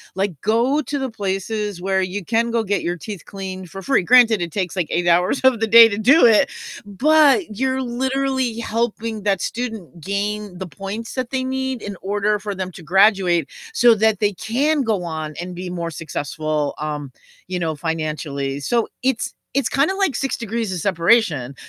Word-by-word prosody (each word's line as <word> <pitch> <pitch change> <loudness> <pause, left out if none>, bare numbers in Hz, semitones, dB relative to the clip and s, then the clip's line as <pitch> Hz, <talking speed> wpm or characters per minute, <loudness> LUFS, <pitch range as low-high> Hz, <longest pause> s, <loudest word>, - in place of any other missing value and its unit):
like, 195 -1 -1
go 240 +8 +2
to 285 +2 -4
the 265 -1 -2
places 205 -1 -3
where 190 0 +1
you 185 +1 -4
can 230 +3 +1
go 230 - +1
get 205 -1 -1
your 175 +1 -2
teeth 200 +1 -8
cleaned 190 -2 -7
for 195 +3 -8
free, 270 -1 +2
granted, 230 -2 +5
it 170 -2 -3
takes 185 -4 -3
like 180 -5 -1
8 175 0 -1
hours 180 +9 +3
of 245 -4 +4
the 225 - +2
day 230 +1 +9
to 205 - -3
do 255 +9 +5
it, 225 -3 +5 0.3
but 290 - +3
you're 265 0 0
literally 260 -1 -1
helping 225 -1 -2
that 195 -2 +1
student 225 -9 -5
gain 200 0 -3
the 190 -1 -6
points 200 +6 -6
that 255 -2 -3
they 260 -1 -1
need 265 -2 -2
in 205 -1 -6
order 205 +2 0
for 205 0 -5
them 185 -1 -5
to 175 - -11
graduate 190 -1 +3 0.2
so 240 - +5
that 215 -1 +2
they 205 -1 +1
can 270 - 0
go 215 -7 -1
on 155 -2 -5
and 180 +1 -6
be 180 +1 -6
more 170 -2 -4
successful, 155 -1 -3
um, 150 -3 -4 0.4
you 180 0 -3
know, 160 -2 -2
financially, 150 -3 -3
so 230 +10 0
it's 260 -2 0 0.2
it's 275 -3 +2
kinda 300 +8 +1
like 390 -8 0
6 270 - -2
degrees 230 -2 -3
of 185 - -3
separation, 170 - +2
205 Hz, 190 wpm, -20 LUFS, 180-235 Hz, 0.4 s, day